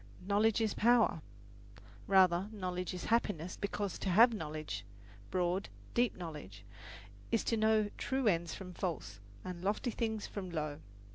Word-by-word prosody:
"Knowledge 210 +3 +3
is 220 -2 +1
power." 230 -7 +4 0.9
Rather, 190 0 +4
knowledge 180 -3 -3
is 180 -1 -5
happiness, 185 -7 0
because 200 -2 -3
to 195 - -2
have 230 +6 +7
knowledge 155 - -4 0.5
broad, 180 +1 0 0.2
deep 240 0 +2
knowledge 150 - -8 0.7
is 230 -3 +2
to 230 - +1
know 220 -1 +3
true 265 -1 -1
ends 170 -4 +1
from 180 -2 -8
false, 155 - -4 0.3
and 180 -1 -6
lofty 210 +5 0
things 220 -2 -2
from 190 -3 -6
low. 155 -3 -3
190 Hz, 140 wpm, -34 LUFS, 170-220 Hz, 0.9 s, have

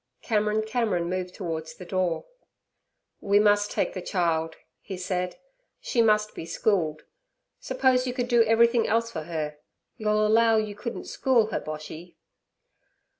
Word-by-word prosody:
Cameron 215 -1 +1
Cameron 215 -7 -1
moved 185 -1 -3
towards 160 -4 -5
the 180 - -10
door. 180 -2 -1 0.9
'We 200 0 +2
must 205 0 +4
take - - -1
the 185 - -5
child' 165 -3 -1 0.2
he 190 - -7
said; 180 0 -2 0.4
'she 235 - +1
must 215 -1 +3
be - - -7
schooled. 165 -2 0 0.6
Suppose 260 -1 +1
you 250 - -2
could 245 -2 -1
do 240 -2 +5
everything 230 +1 +4
else 230 +1 +1
for 160 -6 -5
her, 150 -3 -4 0.4
you'll 215 0 +1
allow 225 +1 +4
you 215 -1 -1
couldn't 235 +3 -6
school 235 -5 +1
her, - - -1
Boshy?' 155 +3 -8
205 Hz, 145 wpm, -26 LUFS, 170-225 Hz, 0.9 s, do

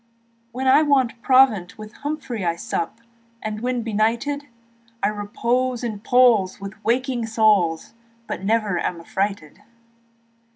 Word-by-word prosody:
When 260 +2 -3
I 265 +3 +6
want 265 -6 +1
provant 255 -10 +3
with 215 0 -10
Humphrey 285 -8 -5
I 170 -1 0
sup, 170 +5 -4 0.4
and 215 -1 -5
when 250 -1 -1
benighted, 235 +7 -1 0.6
I 200 - +3
repose 235 +4 -1
in 220 -4 -3
Paul's 225 -5 +3
with 195 0 -7
waking 245 0 0
souls 210 -8 +2 0.3
Yet - - -5
never 210 -3 +1
am 170 - -2
affrighted. 190 -2 -3
225 Hz, 125 wpm, -22 LUFS, 200-255 Hz, 0.6 s, I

